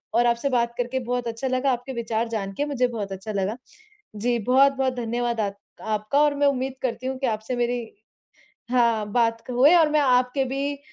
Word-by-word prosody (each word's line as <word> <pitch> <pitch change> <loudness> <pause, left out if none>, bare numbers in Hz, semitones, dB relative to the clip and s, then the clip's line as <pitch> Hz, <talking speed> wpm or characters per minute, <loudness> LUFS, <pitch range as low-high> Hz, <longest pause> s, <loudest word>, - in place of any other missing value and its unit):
और 240 - +4
आपसे 235 +4 +1
बात 235 -2 +1
करके 245 +2 -1
बहुत 245 -1 -1
अच्छा 230 +3 -3
लगा, 260 +1 +1
आपके 250 +2 -4
विचार 230 -1 -2
जान 195 -4 -3
के 290 - 0
मुझे 255 -4 +1
बहुत 215 -5 -5
अच्छा 195 +3 -6
लगा। 200 +3 -1 0.6
जी, 235 +3 0
बहुत-बहुत 265 +3 +3
धन्यवाद 240 0 -2
आ 205 - 0 0.4
आपका 215 +5 0
और 295 -1 +3
मैं 285 0 +3
उम्मीद 265 -1 -1
करती 250 0 -2
हूँ 265 0 -3
कि 265 - 0
आपसे 220 +2 -2
मेरी 240 0 0 1.0
हाँ, 235 -4 +2
बात 230 -1 +1
क - - -7
हुए 260 +7 +5
और 325 -3 +5
मैं 305 - +3
आपके 255 0 +2
भी 275 +2 -3
245 Hz, 200 wpm, -24 LUFS, 230-265 Hz, 1.0 s, हुए